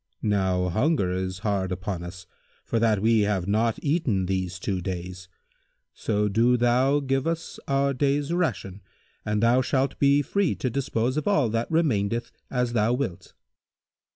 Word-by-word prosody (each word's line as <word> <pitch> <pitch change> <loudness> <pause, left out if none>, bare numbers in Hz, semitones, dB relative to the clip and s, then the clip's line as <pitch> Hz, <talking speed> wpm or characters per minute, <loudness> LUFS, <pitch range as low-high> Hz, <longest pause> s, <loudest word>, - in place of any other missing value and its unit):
Now 95 -3 +1
hunger 110 - +1
is 95 0 -3
hard 95 -3 0
upon 95 0 -4
us, 90 0 -9 0.4
for 115 - 0
that 110 -3 +2
we 115 0 +4
have 100 -3 0
not 110 +2 +1
eaten 140 - +1
these 95 -1 -2
two 95 0 -3
days; 90 0 -6 0.6
so 105 -1 -1
do 115 +5 +3
thou 125 +4 +3
give 135 +1 -1
us 165 0 -4
our 140 0 +1
day's 140 +3 0
ration 100 - -2 0.4
and 105 +1 -1
thou 120 +2 +4
shalt 135 +1 -1
be 140 +1 +4
free 200 0 0
to 130 - -2
dispose 125 0 -1
of 155 - -2
all 150 - +3
that 115 +2 -2
remaineth 120 -9 0 0.2
as 125 -2 -1
thou 115 +1 +2
wilt." 125 -9 -4
115 Hz, 155 wpm, -25 LUFS, 95-135 Hz, 0.6 s, we